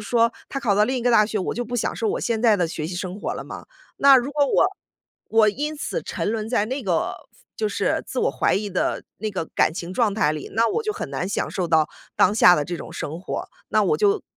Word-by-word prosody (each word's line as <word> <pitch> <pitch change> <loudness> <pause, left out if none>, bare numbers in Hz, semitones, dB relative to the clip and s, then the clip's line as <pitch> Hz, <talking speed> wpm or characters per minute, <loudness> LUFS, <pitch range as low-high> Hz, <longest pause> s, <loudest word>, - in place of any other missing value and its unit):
说， 235 -1 +3 0.2
他 275 - -3
考 225 -7 +1
到 210 - +4
另 255 +3 +1
一 - - -4
个 245 - +2
大 215 -2 +6
学， 215 0 -2
我 185 - -2
就 245 +1 -2
不 245 +2 -4
享 235 - -1
受 225 - -1
我 - - -1
现 230 -1 -1
在 220 -3 +5
的 175 -3 +1
学 160 -1 -5
习 175 - -5
生 185 +2 -5
活 - - -2
了 - - -6
吗？ - - -9 0.3
那 275 -1 +8
如 260 +3 0
果 290 -1 +3
我 280 - +3 0.6
我 220 -1 +4
因 295 +8 -2
此 480 +10 -3
沉 - - -3
沦 220 -1 -3
在 220 -4 +1
那 260 +4 -4
个 175 -5 0 0.2
夫 - - -29 0.2
就 430 -1 0
是 - - 0
自 - - -5
我 - - +2
怀 - - +1
疑 205 0 -2
的 185 - -1
那 215 +1 -3
个 185 -4 -3
感 - - +3
情 175 +1 -6
状 220 -2 +2
态 190 -8 +1
里， 150 -2 -6
那 230 +2 +2
我 455 +2 -1
就 430 -1 -1
很 - - -5
难 180 - -3
享 - - -1
受 180 -3 -2
到 160 -2 +3 0.3
当 210 - +4
下 180 -5 +7
的 145 - 0
这 175 +2 -4
种 - - -9
生 160 +4 -5
活。 - - -5 0.2
那 - - +3
我 450 - +2
就 415 0 +2
215 Hz, 290 characters per minute, -23 LUFS, 185-255 Hz, 0.6 s, 那